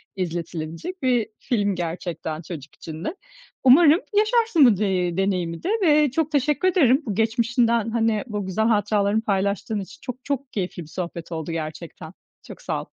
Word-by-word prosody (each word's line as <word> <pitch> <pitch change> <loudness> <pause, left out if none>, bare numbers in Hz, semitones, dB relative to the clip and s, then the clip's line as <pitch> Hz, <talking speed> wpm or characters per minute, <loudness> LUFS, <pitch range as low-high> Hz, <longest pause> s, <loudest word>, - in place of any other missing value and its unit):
izletilebilecek 170 - -5
bir 245 -4 +2
film 205 -5 0
gerçekten 170 -2 -4
çocuk 155 -4 -9
için 160 +1 -8
de. 365 - -3 0.5
Umarım 300 +5 +7 0.2
yaşarsın 430 - +4
bu 215 -6 +5
de 185 -4 0
deneyimi 180 -4 -1
de 370 - -1
ve 300 -4 +4
çok 315 +1 -1
teşekkür 295 +5 +1
ederim, 285 -6 +4
bu 205 -4 -3
geçmişinden, 230 0 +1
hani, 225 -2 +1
bu 210 -3 -4
güzel 215 +4 0
hatıralarını 210 0 +2
paylaştığın 200 +1 -1
için. 190 - -9
Çok, 255 0 -7
çok 275 -1 -3
keyifli 180 -3 -3
bir - - -14
sohbet 170 0 -6
oldu 160 0 -4
gerçekten. 160 +1 -6 0.3
Çok - - -11
sağ - - -2
ol. - - -10
210 Hz, 160 wpm, -23 LUFS, 175-260 Hz, 0.5 s, Umarım